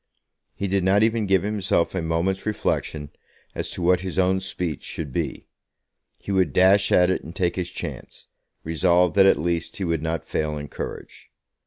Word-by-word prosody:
He 100 - -3
did 95 -1 0
not 100 +3 +4
even 110 -2 +1
give 95 -1 +3
himself 100 -4 0
a 95 - -1
moment's 85 +5 -1
reflection 75 -8 -2 0.4
as - - -3
to 90 - -5
what 90 +1 +4
his 95 0 -5
own 95 0 +3
speech 90 -5 -4
should 75 -5 -6
be. - - -3 0.7
He - - -7
would 95 -7 +2
dash 95 +2 +4
at 90 +1 +5
it - - -2
and 80 - -10
take 90 -2 0
his 90 -2 -3
chance, - - -8 0.4
resolved 85 +1 +2
that 95 -1 +7
at - - +5
least 85 +2 -2
he 100 - -3
would 85 -3 -1
not 80 -1 -3
fail 75 -1 -2
in 75 -1 -7
courage. - - -8
90 Hz, 185 wpm, -24 LUFS, 80-95 Hz, 0.7 s, that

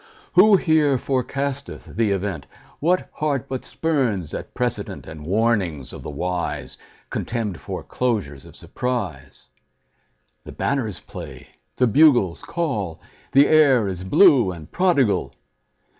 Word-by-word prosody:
Who 200 +2 +7
here 155 -6 +3
forecasteth 140 +2 -3
the 115 -2 +2
event? 95 -7 -2 0.3
What 180 +4 +1
heart 145 -6 -1
but 130 -1 -4
spurns 125 - -1
at - - -7
precedent - - -3
And 80 -1 -9
warnings 95 - 0
of - - -8
the - - -7
wise, 90 +4 -4 0.3
Contemned 110 -7 -3
foreclosures 100 - -3
of - - -15
surprise? 100 - -5 1.0
The - - -10
banners 115 -10 -2
play, - - -10 0.3
the 125 - +3
bugles 120 - +4
call, 105 - -3 0.3
The 140 +2 +6
air 135 -8 +5
is 90 -1 -4
blue 125 - +5
and 80 -3 -10
prodigal. 165 - +1
115 Hz, 120 wpm, -22 LUFS, 90-140 Hz, 1.0 s, Who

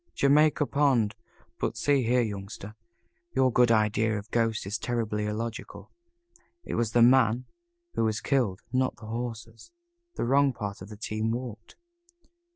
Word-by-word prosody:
"Jamaica 150 +2 +4
Pond. 135 -8 +2 0.5
But - - -2
see 145 -2 +2
here, 125 +1 +2
Youngster, 100 0 -6 0.6
your 130 -2 +3 0.2
idea 110 0 +2
of 105 +2 -9
ghosts 115 -3 0
is 105 +4 -3
terribly 110 -3 -2
illogical. 110 +1 -5 0.7
It - - -6
was 115 -2 0
the 120 - +6
man 125 -1 +4 0.5
who - - +1
was 110 0 0
killed, 110 -6 0
not 130 0 +1
the 110 - -13
horses. 115 - -6 0.4
The - - -1
wrong 140 +2 +3
part 100 -4 -6
of 95 - -9
the 105 - -10
team 110 +1 -2
walked." 115 -2 -5
115 Hz, 145 wpm, -28 LUFS, 105-125 Hz, 0.7 s, the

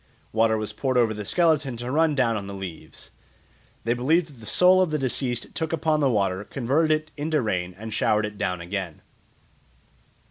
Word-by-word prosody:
Water 110 0 +2
was 110 -1 -4
poured 130 -2 -1
over 115 -3 +3
the 105 -1 -5
skeleton 150 - +1
to 120 +2 -5
run 155 +1 +2
down 115 -4 +2
on 100 -2 -4
the 100 - -6
leaves. 95 -4 -9 0.7
They 115 - +1
believed 155 +8 +2
that 135 -5 -16
the 110 - -10
soul 185 +1 +5
of 185 - +2
the 155 - 0
deceased 125 -2 -2
took 160 0 -1
up 160 - -11
the 155 -3 +3
water, 100 -4 0
converted 135 +8 0
it 155 0 0
into 155 +1 0
rain, 90 -6 -2
and 110 +1 -7
showered 105 0 +2
it 105 -1 -8
down 90 -1 -1
again. 90 -2 -5
120 Hz, 190 wpm, -25 LUFS, 105-155 Hz, 0.7 s, soul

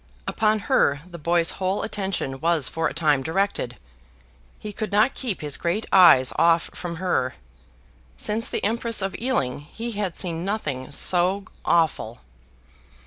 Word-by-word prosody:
Upon 215 0 +1
her 145 -5 +2
the 175 -1 -11
boy's 170 +2 +2
whole 190 +2 0
attention 190 -11 -3
was 165 -3 +1
for 165 0 -1
a - - -5
time 150 -4 +2
directed. 160 -5 -2 0.8
He 210 - -7
could 215 +1 -4
not 215 +6 +3
keep 235 -8 -3
his 150 -2 -1
great 175 +6 -1
eyes 165 -9 +7
off 170 0 +3
from 175 -1 -5
her. 160 -8 -1 0.8
Since 220 +2 -2
the - - -3
Empress 230 0 +1
of 195 0 -2
Ealing, 185 - 0
he 225 +11 -7
had 200 -5 -3
seen 170 -3 -2
nothing 155 -11 -3
so 185 +6 +2 0.2
awful. 155 -9 +1
175 Hz, 145 wpm, -24 LUFS, 155-205 Hz, 0.8 s, eyes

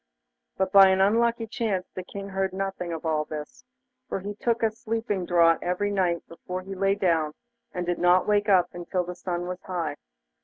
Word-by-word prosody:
But 190 0 0
by 195 0 +9
an 190 0 +2
unlucky 230 +4 +3
chance 215 -4 -2
the 185 - -5
King 200 +2 -8
heard 190 -1 -1
nothing 195 -2 -3
of 165 0 -5
all 155 -1 +1
this, 150 -1 -8 0.5
for - - -2
he 200 +2 -5
took 230 +2 -1
a 220 - +3
sleeping 220 -4 -3
draught 170 -2 +4
every 180 +3 -1
night 180 -4 0
before 180 +2 -6
he 195 +1 -7
lay 195 +1 +1
down, 165 -6 +1 0.4
and 180 -1 -3
did 175 0 -1
not 180 +1 +4
wake 210 0 +2
up 185 -3 +4
until 175 +1 -2
the 180 +1 -6
sun 175 -1 -4
was 180 +1 -5
high. 165 -6 -3
185 Hz, 195 wpm, -26 LUFS, 175-200 Hz, 0.5 s, by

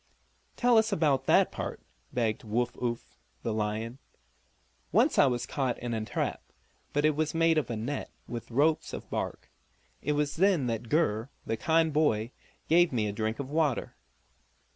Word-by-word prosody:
"Tell 245 -2 +5
us 220 0 +1
about 145 -8 +2
that - - +5
part!" - - -5 0.3
begged 115 -3 -1
Woo 115 +3 0
Uff, 120 -1 -4 0.2
the 115 - -1
lion. 110 +3 -2 0.9
"Once - - +3
I 140 - +7
was 120 -2 -1
caught 130 -3 -1
in 120 -1 -4
a 110 -1 -1
trap, - - -2 0.5
but 145 +1 +1
it 155 -1 +3
was 155 +1 -1
made 165 -1 +4
of 140 - -4
a 120 - -2
net, 120 +6 -3 0.2
with 120 -2 -6
ropes 150 +6 +1
of - - -6
bark. - - -4 0.5
It 150 - 0
was 145 0 -1
then 185 -6 +3
that 115 -1 -3
Gur, 130 -7 +1 0.2
the 115 - -1
kind 160 +5 +2
boy, 125 -7 +2 0.4
gave 175 +2 +5
me 115 -4 0
a 105 - -1
drink 110 +1 -2
of 140 0 -5
water." 150 -4 0
130 Hz, 170 wpm, -29 LUFS, 115-155 Hz, 0.9 s, I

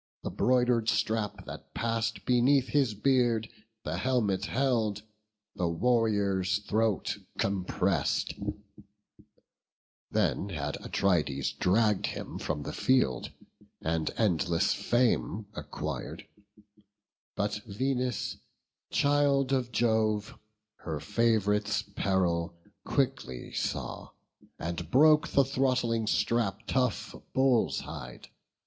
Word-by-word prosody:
The - - -3
broider'd 125 -3 +2
strap, 110 -2 -1
that, - - -10
pass'd 115 0 -1
beneath 130 +2 +3
his 135 -7 +2
beard, 120 -1 +2 0.4
The - - -3
helmet 105 -7 +1
held, 115 -5 0 0.5
the 90 - 0
warrior's 100 -2 +1
throat 110 -1 0 0.2
compress'd: 95 -2 0 1.8
Then 100 - 0
had 75 -5 -3
Atrides 75 -8 +1
dragg'd 105 +2 +2
him - - -6
from 75 -1 -3
the - - -5
field, 125 - +1 0.5
And 80 0 -1
endless 90 -3 +2
fame 120 -3 +1
acquir'd; - - -5 1.1
but 105 +1 -1
Venus, 125 +3 -1 0.5
child 140 -2 +2
Of 130 -3 0
Jove, 110 -3 +1 0.4
her 80 -3 -5
fav'rite's 105 +1 +1
peril 90 -4 -1 0.3
quickly 130 - -2
saw. - - -3 0.5
And 85 0 -4
broke 150 +6 +5
the 140 - +3
throttling 125 -4 +1
strap 110 -3 +1
of - - -32
tough 125 -4 -1 0.2
bull's 130 -3 +3
hide. 60 0 -9
110 Hz, 95 wpm, -29 LUFS, 95-125 Hz, 1.8 s, broke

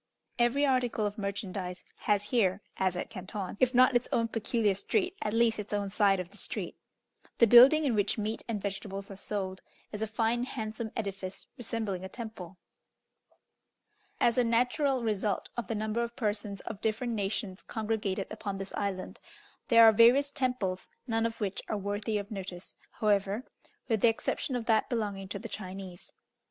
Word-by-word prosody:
Every 240 +5 +3
article 250 -5 +1
of 205 +1 -3
merchandise 195 -2 -4
has 205 -1 +1
here, 200 -4 +2
as 185 -1 +1
at 180 - -4
Canton, 190 0 -5
if 255 0 +3
not 255 +1 +6
its 240 - +2
own 230 -1 +1
peculiar 225 -2 +1
street, 370 - 0
at 210 - -1
least 225 0 +3
its 210 0 -3
own 200 -1 -2
side 195 -2 +3
of 180 0 -5
the 205 - -12
street. - - -5 0.6
The 235 - +7
building 255 +7 +8
in 265 - +2
which 205 0 +1
meat 215 +1 -2
and 225 -3 -2
vegetables 195 0 -5
are - - -7
sold, 190 -1 -4 0.3
is 210 - -5
a 220 - 0
fine 230 +2 0
handsome 220 -2 -4
edifice 195 -3 -5
resembling 220 -5 -3
a 190 - -6
temple. 195 -6 -8 1.6
As 240 +1 +3
a - - +5
natural 250 +3 +2
result 210 -2 -1
of 240 -5 -3
the 225 - -2
number 215 +2 -1
of 235 0 -3
persons 205 -3 -2
of 200 - -7
different 230 +2 -1
nations 200 -2 -2
congregated 210 -3 -2
upon 205 -2 -4
this 195 0 -6
island, 195 -2 -3 0.5
there 230 -2 +7
are 225 - +10
various 245 +6 +6
temples, 250 -10 -1 0.2
none 225 -2 +1
of 230 - -8
which 200 -3 -2
are 215 - -1
worthy 205 +2 -2
of 200 +2 -5
notice, 185 -3 -6 0.2
however, 205 +1 +1 0.4
with 225 -4 +1
the - - +6
exception 240 +3 -2
of 240 -2 -2
that 220 -2 +2
belonging 205 -5 -2
to 200 - -4
the - - -7
Chinese. 185 -2 -8
215 Hz, 175 wpm, -30 LUFS, 195-235 Hz, 1.6 s, are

